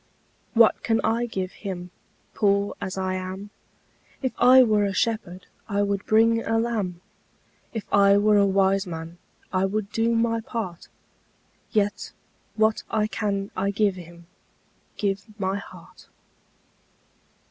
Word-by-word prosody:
What 230 -1 +5
can 225 -1 +1
I 230 +2 +1
give 190 -4 -4
Him, 180 -3 -7 0.4
Poor 200 -1 +1
as 190 +1 -4
I 185 0 -1
am? 185 +2 -6 0.7
If 260 - 0
I 255 +1 +8
were 215 -3 +2
a 200 -1 0
shepherd, 190 -6 -2 0.2
I 205 0 +1
would 200 0 -2
bring 230 +1 +4
a 225 - 0
lamb; 215 -7 -2 0.7
If 225 -4 -5
I 200 0 +6
were 210 +1 +4
a 200 - +5
wise 195 0 +2
man, 165 0 -7 0.3
I 185 +1 +2
would 205 +1 -2
do 230 +1 +1
my 230 0 +1
part: 215 -7 -5 0.8
Yet 205 -1 -1 0.4
what 220 0 +2
I 215 -1 +1
can 200 -2 -2
I 195 +1 0
give 200 0 +1
Him, 170 -1 -12 0.7
Give 200 -1 -1 0.2
my 190 0 -1
heart. 200 - -13
200 Hz, 135 wpm, -25 LUFS, 190-220 Hz, 0.8 s, I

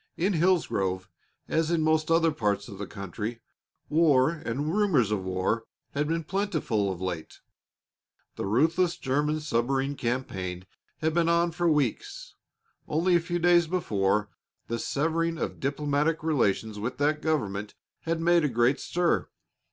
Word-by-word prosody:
In 190 +4 +1
Hillsgrove, 155 - +1 0.4
as 160 0 +1
in 170 -2 +1
most 155 0 +2
other 165 0 +4
parts 105 -8 -1
of 100 - -10
the 100 - -4
country, 105 +3 -5 0.5
war 150 -4 +4
and 150 -1 -3
rumors 175 - +2
of 100 -3 -1
war 95 +5 -1 0.3
had 145 +1 -1
been 165 +1 -1
plentiful 155 - -1
of 90 - -6
late. 90 -4 -5 1.0
The - - -3
ruthless 165 - +2
German 150 +3 0
submarine 135 0 0
campaign 95 -8 -3 0.4
had 160 0 +1
been 170 0 +2
on 170 0 +3
for 170 +1 +1
weeks. 145 -7 -1 0.5
Only 170 +4 +2
a - - +5
few 175 +1 -2
days 175 0 +4
before, 105 - 0 0.4
the 115 0 -2
severing 165 +5 0
of - - -4
diplomatic 145 +3 0
relations 110 -8 0
with 120 +5 -3
that 150 +1 +1
government 105 -11 -2 0.2
had 165 0 -2
made 170 0 +4
a 150 - +2
great 120 +2 +2
stir. 175 0 0
150 Hz, 145 wpm, -27 LUFS, 110-165 Hz, 1.0 s, a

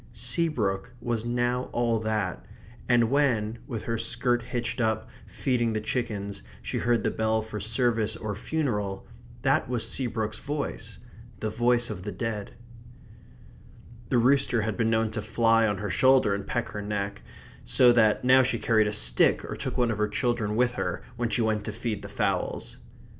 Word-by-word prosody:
Seabrook 120 - 0
was 115 -1 -2
now 120 +1 0
all 120 -2 +1
that; 110 -1 -2 0.5
and 120 -1 +4
when, 120 -6 +1
with 115 -6 -4
her 115 -1 -2
skirt 120 +1 +1
hitched 120 +1 -3
up, 110 -1 0 0.2
feeding 120 -4 0
the 110 - 0
chickens, 105 - -3 0.2
she - - -3
heard 120 0 +1
the - - +1
bell 110 0 0
for 110 -1 -6
service 110 0 +1
or 110 -2 -4
funeral, 105 -6 -2 0.4
that - - +2
was 120 -3 -1
Seabrook's 110 -4 -2
voice 145 0 -4 0.4
the 110 - -2
voice 120 +1 +2
of 90 -4 -6
the 105 - -4
dead. 105 +1 -4 1.5
The 125 - +2
rooster 125 -2 +3
had 110 -1 -2
been 115 -2 +1
known 110 -1 +1
to 110 0 -3
fly 115 +1 +3
on 105 -2 -1
her 100 +1 -4
shoulder 130 -6 +4
and 100 0 -4
peck 120 - -2
her 105 - -5
neck, 100 -1 -3 0.4
so 125 -1 +6
that 110 -2 +3
now 130 +1 +7
she 125 -2 +1
carried 110 -2 +3
a 105 - -2
stick - - +3
or - - -5
took - - -4
one 120 -2 +2
of 110 - -3
the 105 - +2
children 105 -1 0
with 125 +1 +3
her 125 - -3
when 120 -1 -1
she 115 - +1
went 110 -1 0
to 105 - -3
feed 110 -1 -4
the - - -8
fowls. - - -2
115 Hz, 175 wpm, -27 LUFS, 105-120 Hz, 1.5 s, now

